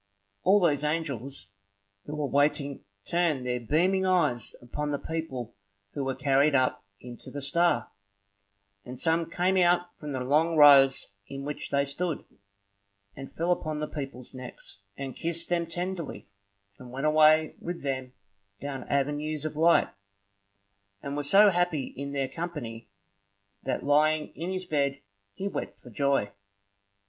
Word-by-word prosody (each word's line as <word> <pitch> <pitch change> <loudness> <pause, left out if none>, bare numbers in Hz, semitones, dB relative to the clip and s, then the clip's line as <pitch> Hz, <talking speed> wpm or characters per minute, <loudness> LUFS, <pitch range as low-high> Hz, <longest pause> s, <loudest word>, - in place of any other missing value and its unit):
All 195 +3 +5
these 150 -6 +2
angels 140 -8 -3 0.6
who 150 - -4
were 150 -1 -1
waiting 145 0 +1 0.2
turned 165 -7 +1
their 125 0 -1
beaming 175 - +2
eyes 160 -11 +1
upon 150 +5 -4
the 145 - 0
people 135 -8 -5 0.4
who 140 - -3
were 135 -1 -2
carried 140 +1 +3
up 130 -1 +1 0.2
into 120 -1 -10
the 145 - -5
star; 145 -4 +1 1.0
and 125 +2 -8
some 165 0 +1
came 180 +3 +1
out 175 0 +3
from 150 -1 -6
the 130 - -2
long 155 +6 +2
rows 140 -2 +7 0.2
in 135 0 -7
which 150 0 -5
they 140 0 +2
stood, 160 +4 -2 0.9
and 135 0 -9
fell 170 +2 0
upon 155 -3 -1
the 150 - -1
people's 135 -4 -7
necks, 125 -5 -10 0.2
and 135 -2 -5
kissed 170 0 0
them 170 -1 0
tenderly, 175 - -5 0.5
and 125 -1 -11
went 135 +3 -3
away 155 0 +5
with 175 -2 -6
them 130 -2 -3 0.5
down 135 -2 -5
avenues 145 +2 -1
of 155 - -3
light, 165 +2 +4 1.1
and 140 0 -4
were 145 - -1
so 195 +8 +6
happy 175 -6 0
in 140 +1 -5
their 140 -1 -1
company, 130 -8 -6 0.7
that 135 - -2
lying 150 +2 +3
in 170 +3 -5
his 185 -1 -3
bed 140 -3 0 0.4
he 195 - -3
wept 200 - -5
for 125 - -14
joy. 140 -4 +1
145 Hz, 150 wpm, -28 LUFS, 135-165 Hz, 1.1 s, rows